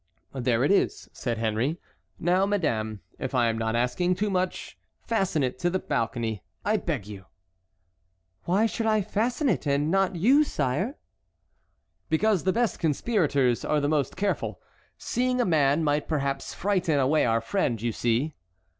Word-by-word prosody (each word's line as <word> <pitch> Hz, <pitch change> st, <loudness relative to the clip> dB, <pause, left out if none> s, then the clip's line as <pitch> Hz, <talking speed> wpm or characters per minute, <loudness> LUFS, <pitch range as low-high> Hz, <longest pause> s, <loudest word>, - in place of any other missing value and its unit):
"There 125 Hz, -2 st, +1 dB
it 145 Hz, -, +3 dB
is," 200 Hz, -, +1 dB
said 120 Hz, -3 st, -3 dB
Henry; 115 Hz, +8 st, -1 dB, 0.4 s
"now, 180 Hz, +3 st, +2 dB
madame, 110 Hz, -, -1 dB, 0.2 s
if 135 Hz, 0 st, -3 dB
I 120 Hz, -2 st, +3 dB
am 115 Hz, -, -1 dB
not 110 Hz, 0 st, -1 dB
asking 125 Hz, +10 st, +1 dB
too 205 Hz, +2 st, -1 dB
much, 185 Hz, -1 st, -2 dB, 0.3 s
fasten 190 Hz, -10 st, 0 dB
it 130 Hz, 0 st, -2 dB
to 175 Hz, -, +1 dB
the 185 Hz, -, 0 dB
balcony, 115 Hz, -, -2 dB, 0.2 s
I 215 Hz, +1 st, +2 dB
beg 150 Hz, -, -3 dB
you." 100 Hz, -2 st, -10 dB, 1.2 s
"Why 190 Hz, +6 st, +3 dB
should 225 Hz, 0 st, -1 dB
I 215 Hz, -2 st, +2 dB
fasten 230 Hz, -, 0 dB
it 175 Hz, -, 0 dB
and 145 Hz, +2 st, +1 dB
not 195 Hz, -1 st, +2 dB
you, 255 Hz, -, +5 dB
sire?" 135 Hz, -, -1 dB
said 190 Hz, -, +1 dB
Marguerite. 270 Hz, +6 st, -8 dB, 1.1 s
"Because 195 Hz, +3 st, +2 dB
the 190 Hz, -, +4 dB
best 235 Hz, 0 st, 0 dB
conspirators 145 Hz, -, +1 dB
are 150 Hz, -, +1 dB
the 145 Hz, -, 0 dB
most 150 Hz, -2 st, 0 dB
careful. 200 Hz, +1 st, -1 dB, 0.4 s
Seeing 250 Hz, +1 st, -1 dB
a 245 Hz, -, +3 dB
man 150 Hz, -2 st, +3 dB
might 145 Hz, -1 st, 0 dB
perhaps 140 Hz, -3 st, -2 dB
frighten 185 Hz, -6 st, +1 dB
away 140 Hz, +4 st, +3 dB
our 115 Hz, -1 st, +2 dB
friend, 120 Hz, -, -1 dB
you 115 Hz, +2 st, -1 dB
see." 120 Hz, +7 st, 0 dB
155 Hz, 165 wpm, -26 LUFS, 125-195 Hz, 1.2 s, you